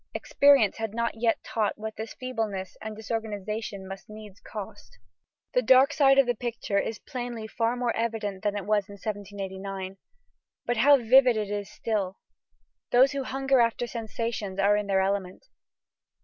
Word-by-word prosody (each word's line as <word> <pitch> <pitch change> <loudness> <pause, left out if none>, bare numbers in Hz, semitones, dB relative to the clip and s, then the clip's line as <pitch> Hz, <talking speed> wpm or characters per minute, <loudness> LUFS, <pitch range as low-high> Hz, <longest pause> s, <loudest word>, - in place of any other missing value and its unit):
Experience 280 -7 +4
had 225 -1 -4
not 235 0 0
yet 225 0 0
taught 215 -2 -1
what 220 0 -6
this 220 +1 -7
feebleness 220 -7 -4
and 220 0 -6
disorganization 215 -2 -4
must 195 +1 -9
needs 215 -1 -11
cost." 205 - -9 0.6
The 250 - +3
dark 260 +4 +5
side 270 -2 +5
of 275 - +6
the 245 - +1
picture 230 -4 -2
is 220 +2 -3
plainly 245 -4 -6
far 230 +2 -1
more 245 -1 -1
evident 215 -4 -2
than 205 -1 -1
it 200 - -5
was 210 -1 +1
in - - -9
1789. 195 -2 -5 0.7
But 240 - 0
how 280 +5 +7
vivid 250 0 +5
it 210 -1 -2
is 205 -1 -3
still! 200 -5 -2 0.7
Those 260 +3 +5
who 275 -2 -3
hunger 270 0 +1
after 235 +1 +2
sensations 225 -3 -4
are 200 +1 +4
in 210 -1 -1
their 190 -1 +2
element. 190 - -2
220 Hz, 165 wpm, -27 LUFS, 200-240 Hz, 0.7 s, how